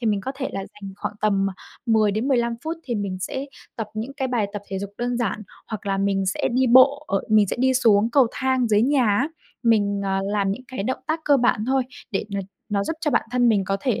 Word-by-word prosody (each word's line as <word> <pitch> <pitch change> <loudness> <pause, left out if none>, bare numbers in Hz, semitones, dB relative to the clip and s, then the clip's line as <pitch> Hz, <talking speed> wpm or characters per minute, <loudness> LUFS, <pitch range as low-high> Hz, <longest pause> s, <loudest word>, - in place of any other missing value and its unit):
thì 235 - -2
mình 205 -2 +1
có 265 +7 -4
thể 270 -1 -3
là 195 - -3
dành 195 0 -9
khoảng - - -4
tầm 200 -2 +2 0.4
10 220 -2 +4
đến 220 +7 -1
15 235 -3 +2
phút 325 +1 -2
thì 240 - -2
mình 200 -3 -3
sẽ 265 +8 -3 0.3
tập 225 - -3
những 225 +5 -4
cái 265 -2 -1
bài 230 -5 0
tập 205 -1 -5
thể 195 0 -3
dục 200 0 -5
đơn 245 0 -1
giản 225 -3 -2 0.2
hoặc 215 -2 -6
là 195 -1 0
mình 195 -1 +1
sẽ 185 - 0
đi 260 +1 +3
bộ 265 +4 +6
ở 195 - +1
mình 215 -1 +5
sẽ - - -3
đi 260 0 +3
xuống 225 -3 +4
cầu 270 -1 +5
thang 260 -2 +1
dưới 210 0 +4
nhà 270 0 +3
á, 210 +9 +2 0.3
mình, 205 -3 +2
à, 195 0 0
làm 200 -1 0
những 255 +6 -7
cái 260 -6 -4
động 260 +5 -2
tác 315 +1 -1
cơ 285 - +5
bản 240 -4 +2
thôi 265 0 +2 0.3
để 195 - -1
n - - 0 0.3
nó 200 -1 0
giúp - - -1
cho 300 - 0
bản - - +1
thân 245 -1 +3
mình 205 -4 +3
có 195 0 0
thể 250 -2 0
220 Hz, 255 wpm, -23 LUFS, 200-260 Hz, 0.4 s, bộ